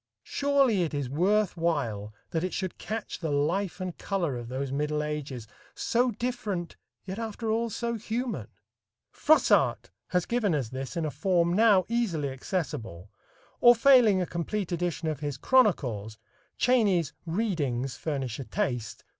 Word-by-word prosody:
Surely 275 -8 +2
it 160 -3 -1
is 140 -3 -3
worth 195 +6 +2
while 120 - -1 0.2
that 160 0 -1
it 185 - -2
should 185 -2 -4
catch 220 +3 -5
the 160 -1 -3
life 165 +7 0
and 185 -2 -5
color 175 -9 -1
of 120 -1 -6
those 130 +2 -3
middle 150 +2 -1
ages 145 -6 -5 0.3
so 245 +2 +1
different, 215 -7 -3 0.3
yet 190 +2 -5
after 225 0 -3
all 230 +1 0
so 235 +2 -2
human. 235 +2 -3 0.6
Froissart 315 0 +3 0.2
has 180 -2 0
given 220 -8 +1
us 130 -6 -2
this 135 +6 -5
in 165 - 0
a 150 - -2
form 170 +3 +1
now 205 -2 +5
easily 195 -12 0
accessible, 120 - -4 0.5
or 240 0 +8
failing 235 -5 +6
a 180 - 0
complete 175 +3 -3
edition 175 -1 -2
of 155 -3 -2
his 145 -2 -3
"Chronicles," 125 - +2 0.4
Cheyney's 205 - +2
"Readings" 150 - -1
furnish 135 -7 -3
a - - -3
taste 125 - -3
(pp. - - -43
175 Hz, 155 wpm, -28 LUFS, 140-215 Hz, 0.6 s, or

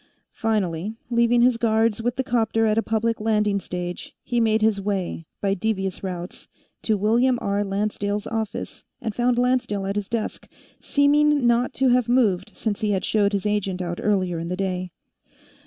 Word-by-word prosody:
Finally, 205 -2 -1 0.2
leaving 235 0 +4
his 245 -1 +4
guards 225 -1 +2
with 245 +1 -1
the 265 - -1
'copter 225 -2 +1
at 215 -1 +2
a 225 - +3
public 225 0 -1
landing 210 -2 +1
stage, 180 -1 -6
he 240 - -1
made 220 -1 +2
his 215 -2 +2
way, 190 -5 -3
by 195 -1 +1
devious 195 -2 -2
routes, 180 -1 -6 0.3
to 215 -2 +1
William 235 +5 +3
R. 200 -1 0
Lancedale's 205 +1 -2
office, 220 -2 -4 0.2
and 220 - -4
found 240 +2 +1
Lancedale 245 -5 +1
at 195 +1 -2
his 205 -1 -3
desk, 230 -2 -4 0.3
seeming 290 -1 +3
not 240 +1 +2
to 265 0 +3
have 245 -1 +2
moved 210 -7 +2
since 215 -1 -2
he 215 - 0
had 195 -2 0
showed 205 -2 +2
his 200 -1 -2
agent 205 -3 -1
out 175 -1 -4
earlier 185 -5 0
in 165 - -4
the 180 +1 -3
day. 185 -2 -2
215 Hz, 175 wpm, -23 LUFS, 195-235 Hz, 0.3 s, leaving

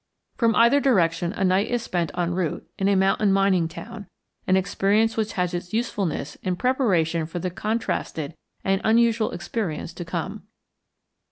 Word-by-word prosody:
From 230 -2 +2
either 235 +5 +5
direction 175 -10 +2
a 200 - -2
night 190 +2 +3
is 240 -1 -1
spent 170 -3 -1
en 175 -1 0
route 175 -3 -2
in 195 - +1
a 200 - +3
mountain 195 +2 +3
mining 195 -3 +3
town, 205 +5 -9 0.4
an 185 - +4
experience 200 +3 +1
which 220 -1 -1
has 180 -1 -1
its 175 +1 -5
usefulness 195 - -2
in 185 -1 -2
preparation 175 - +1
for 170 - -6
the 180 +1 -2
contrasted 180 -7 -2 0.3
and 195 0 +1
unusual 230 0 +3
experience 175 -2 -4
to 175 - -6
come. 185 +5 -5
195 Hz, 160 wpm, -24 LUFS, 175-220 Hz, 0.4 s, either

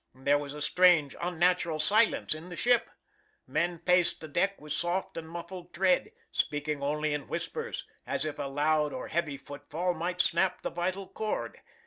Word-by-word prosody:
There 140 +2 +2
was 145 0 -6
a 150 - -4
strange, 175 -6 +4
unnatural 175 -1 +2
silence 210 +8 +3
in 160 +3 -9
the 175 - -6
ship. 245 +5 +3 0.6
Men 175 0 0
paced 180 +1 +3
the 160 - -7
deck 195 +7 0
with 150 0 -5
soft 175 +4 -1
and 160 -1 -6
muffled 175 +1 -8
tread, 185 - +3 0.2
speaking 150 0 -1
only 150 +1 0
in 150 -1 -3
whispers, - - -4 0.2
as - - 0
if 155 - -4
a - - -2
loud 150 +1 +2
or 130 - -5
heavy 155 -4 -1
footfall 145 +6 -3
might 175 +2 -3
snap 180 +1 +2
the - - -2
vital 185 +3 -2
cord. 215 +2 -3
170 Hz, 170 wpm, -30 LUFS, 150-180 Hz, 0.6 s, strange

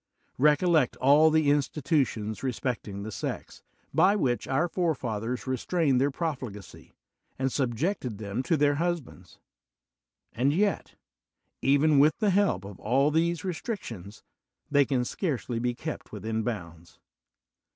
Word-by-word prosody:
Recollect 150 0 +3
all 145 +4 +5
the 155 -2 +3
institutions 140 -7 0
respecting 120 -6 -3
the 110 - -6
sex, - - -5 0.3
by 200 +2 +4
which 125 -11 0
our 135 +6 +1
forefathers 125 - -2
restrained 130 +1 +1
their 140 - +3
profligacy 130 - -6 0.4
and 130 0 -1
sub 125 -4 -1
jected 130 - -2
them 105 +3 -3
to 160 +5 +1
their 145 0 +2
husbands; 130 - -4 1.0
and 130 +6 +1
yet, 200 +4 0 0.7
even 140 +2 +4
with 150 +2 +4
the 210 -3 +2
help 185 - +1
of 100 -2 -10
all 135 +7 +2
these 165 +1 +1
restrictions, 140 - -6 0.5
they 145 -1 +5
can 130 -3 0
scarcely 125 - -2
be 120 0 -1
kept 155 +5 -6
within 110 0 -3
bounds. 85 -8 -6
135 Hz, 130 wpm, -27 LUFS, 115-160 Hz, 1.0 s, all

